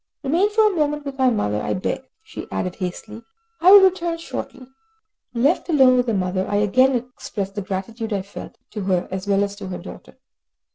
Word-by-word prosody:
Remain 335 Hz, +9 st, +2 dB
for 435 Hz, +1 st, +3 dB
a 420 Hz, -3 st, +2 dB
moment 295 Hz, -2 st, -1 dB
with 275 Hz, -1 st, -6 dB
my 260 Hz, -1 st, +4 dB
mother, 105 Hz, -, -1 dB
I -, -, -2 dB
beg," 185 Hz, -, -2 dB, 0.2 s
she -, -, -9 dB
added 180 Hz, -1 st, -3 dB
hastily, 205 Hz, +4 st, -6 dB, 0.4 s
"I 360 Hz, +3 st, +6 dB
will 405 Hz, 0 st, +10 dB
return 355 Hz, -3 st, +2 dB
shortly." 270 Hz, -5 st, -7 dB, 0.7 s
Left 280 Hz, +10 st, +1 dB
alone 265 Hz, -5 st, +5 dB
with 250 Hz, 0 st, +1 dB
the 225 Hz, -, +1 dB
mother, 185 Hz, 0 st, -1 dB
I 205 Hz, -, -1 dB
again 255 Hz, +6 st, +3 dB
expressed 235 Hz, -5 st, -5 dB
the 205 Hz, -, -4 dB
gratitude 220 Hz, +4 st, -5 dB
I 200 Hz, -2 st, -1 dB
felt, 200 Hz, -, -10 dB
to 210 Hz, -, -5 dB
her 185 Hz, -2 st, 0 dB
as 190 Hz, +1 st, -5 dB
well 200 Hz, 0 st, +3 dB
as 200 Hz, 0 st, -4 dB
to 200 Hz, -2 st, -7 dB
her 185 Hz, -, -5 dB
daughter. -, -, -12 dB
230 Hz, 200 wpm, -22 LUFS, 195-295 Hz, 0.7 s, will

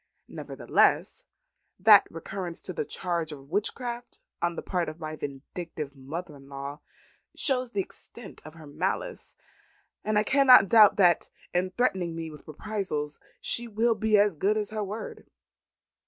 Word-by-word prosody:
Nevertheless, -, -, 0 dB, 0.5 s
that 205 Hz, +2 st, +7 dB
recurrence 175 Hz, +1 st, -6 dB
to 185 Hz, -, -5 dB
the 150 Hz, -, -3 dB
charge 170 Hz, -2 st, -2 dB
of 140 Hz, 0 st, -11 dB
witchcraft 240 Hz, +4 st, -3 dB, 0.2 s
on 170 Hz, 0 st, 0 dB
the -, -, -5 dB
part 175 Hz, -4 st, -1 dB
of 155 Hz, +2 st, -10 dB
my 155 Hz, -1 st, -5 dB
vindictive 145 Hz, +1 st, -7 dB
mother 150 Hz, +4 st, -7 dB
in 135 Hz, 0 st, -16 dB
law 140 Hz, +1 st, -6 dB, 0.6 s
shows 255 Hz, -3 st, +2 dB
the 200 Hz, -, +1 dB
extent 235 Hz, +4 st, -10 dB
of 155 Hz, +1 st, -12 dB
her 160 Hz, -2 st, -12 dB
malice, 185 Hz, -, -3 dB, 0.7 s
and 215 Hz, 0 st, 0 dB
I 210 Hz, -, +4 dB
cannot 255 Hz, -5 st, +6 dB
doubt 215 Hz, -3 st, +7 dB
that 175 Hz, -4 st, +3 dB, 0.2 s
in 180 Hz, +1 st, +1 dB
threatening 185 Hz, -6 st, 0 dB
me 165 Hz, -1 st, -5 dB
with 150 Hz, -, -14 dB
reprisals 155 Hz, -3 st, -4 dB, 0.2 s
she 240 Hz, 0 st, 0 dB
will 230 Hz, +2 st, +2 dB
be 220 Hz, 0 st, +2 dB
as 205 Hz, -3 st, +3 dB
good 200 Hz, +8 st, +1 dB
as 210 Hz, -1 st, -2 dB
her 215 Hz, -1 st, -2 dB
word. 205 Hz, +3 st, -7 dB
185 Hz, 155 wpm, -27 LUFS, 155-215 Hz, 0.7 s, that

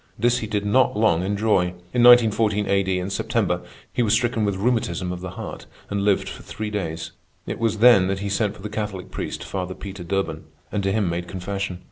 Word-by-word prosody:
This 120 Hz, +3 st, +2 dB
he 110 Hz, -, -4 dB
did 105 Hz, -1 st, -2 dB
not 120 Hz, +1 st, +3 dB
long 105 Hz, -6 st, +3 dB
enjoy. 100 Hz, -3 st, +1 dB, 0.2 s
In 125 Hz, -, +2 dB
1914 110 Hz, -4 st, +5 dB
A.D., 95 Hz, -1 st, +1 dB
in 90 Hz, +2 st, -4 dB
September, 95 Hz, -4 st, 0 dB, 0.3 s
he -, -, +1 dB
was 110 Hz, -2 st, +2 dB
stricken 115 Hz, -1 st, +1 dB
with 100 Hz, -1 st, 0 dB
rheumatism 95 Hz, -5 st, 0 dB
of 90 Hz, -, -7 dB
the 95 Hz, -, -5 dB
heart -, -, -7 dB, 0.2 s
and 100 Hz, 0 st, 0 dB
lived 100 Hz, -1 st, +2 dB
for -, -, -7 dB
three 105 Hz, 0 st, -5 dB
days. 85 Hz, -6 st, -4 dB, 0.3 s
It -, -, -5 dB
was 115 Hz, -2 st, +1 dB
then 110 Hz, -5 st, +6 dB
that 95 Hz, 0 st, -1 dB
he 100 Hz, +1 st, -4 dB
sent 100 Hz, +1 st, 0 dB
for 95 Hz, -, -13 dB
the -, -, -3 dB
Catholic 105 Hz, -3 st, -5 dB
priest, -, -, -4 dB
Father 95 Hz, -1 st, -4 dB
Peter 95 Hz, -3 st, -8 dB
Durban, 95 Hz, +3 st, -2 dB, 0.3 s
and 105 Hz, -, -1 dB
to 95 Hz, 0 st, 0 dB
him 105 Hz, -1 st, +1 dB
made 85 Hz, +1 st, -2 dB
confession. 95 Hz, 0 st, -4 dB
100 Hz, 210 wpm, -23 LUFS, 95-110 Hz, 0.3 s, then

